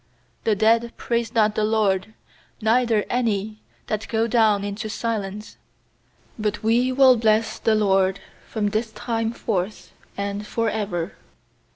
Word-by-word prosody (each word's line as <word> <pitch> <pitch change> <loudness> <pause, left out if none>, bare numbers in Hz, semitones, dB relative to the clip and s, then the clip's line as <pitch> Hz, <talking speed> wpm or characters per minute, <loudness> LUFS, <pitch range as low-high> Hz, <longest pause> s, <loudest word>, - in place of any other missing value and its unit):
17The 215 -2 +3
dead 230 +2 +3
praise 235 -1 -1
not 215 -2 +3
the 215 - 0
LORD, 210 -1 +1 0.4
Neither 225 -1 +2
any 215 -3 -1 0.2
that 215 0 -3
go 225 0 +1
down 220 -3 +3
intc 205 +2 -4
silence; 210 -2 -4 0.8
18But 210 0 -2
we 240 +3 +3
will 260 -1 +6
bless 220 0 +1
the 220 - +2
LORD 195 -2 +2 0.3
From 210 -2 -1
this 220 +2 -2
time 225 +1 -2
forth 210 -3 -3 0.2
and 200 +1 -3
for 230 -1 0
ever. 195 -5 -3
220 Hz, 135 wpm, -23 LUFS, 205-230 Hz, 0.8 s, will